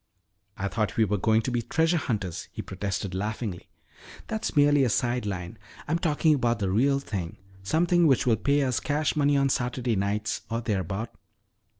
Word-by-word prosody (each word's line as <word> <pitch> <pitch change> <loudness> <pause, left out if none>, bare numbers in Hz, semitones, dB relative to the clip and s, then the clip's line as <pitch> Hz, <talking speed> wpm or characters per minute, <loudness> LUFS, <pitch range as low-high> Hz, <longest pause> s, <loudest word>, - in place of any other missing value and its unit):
"I 100 - -2
thought 105 -2 -2
we 110 - +4
were 105 0 -1
going 110 +3 +3
to 130 - -2
be 120 -1 0
treasure 160 +8 +1
hunters," 100 - -3
he - - -6
protested 95 -1 -4
laughingly. 105 -1 -4 0.6
"That's 220 -4 -3
merely 145 -1 +5
a 125 - +2
side 120 +1 0
line. 90 -3 -5 0.3
I'm 165 +3 0
talking 160 -2 +2
about 120 -4 +1
the 100 -3 -1
real 135 +7 +3
thing, 95 -11 -5 0.2
something 170 - +3
which 135 -2 +3
will 115 -3 +3
pay 140 0 +2
us 130 -2 0
cash 150 +2 0
money 145 -1 +3
on 140 0 +2
Saturday 125 -2 -1
nights 100 +2 -1
or 115 0 -1
thereabout." 100 0 -3
120 Hz, 180 wpm, -27 LUFS, 100-145 Hz, 0.6 s, merely